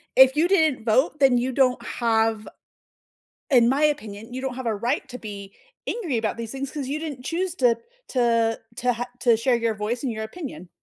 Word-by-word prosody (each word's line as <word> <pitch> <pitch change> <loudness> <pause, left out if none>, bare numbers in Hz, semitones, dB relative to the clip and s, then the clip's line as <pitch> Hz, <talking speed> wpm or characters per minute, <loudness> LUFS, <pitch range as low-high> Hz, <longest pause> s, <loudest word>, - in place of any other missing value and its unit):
If 265 +1 +7
you 320 +3 +3
didn't 315 - +2
vote, 260 +6 +2
then 265 -3 +5
you 255 +2 0
don't 255 -1 +2
have" 225 -2 0 1.0
in 240 -4 +6
my 275 +4 +1
opinion, 225 -6 -2
you 260 - -4
don't 265 -2 -3
have 260 - -5
a 225 - +1
right 240 +7 -1
to 250 -1 -8
be 200 -2 -8 0.4
angry 350 - -2
about 220 -1 -1
these 230 0 -6
things, 270 0 -4
'cause 290 -3 -4
you 295 +2 -2
didn't 285 -6 -6
choose 345 +3 -2
to 240 -3 +3 0.3
to 230 -3 +2 0.2
to 245 0 +1
ha 240 +1 -4
to 235 -2 +4
share 240 +2 +2
your 230 -1 0
voice 215 +5 -3
and 255 -4 -1
your 220 - -5
opinion. 220 - -8
245 Hz, 205 wpm, -24 LUFS, 225-275 Hz, 1.0 s, If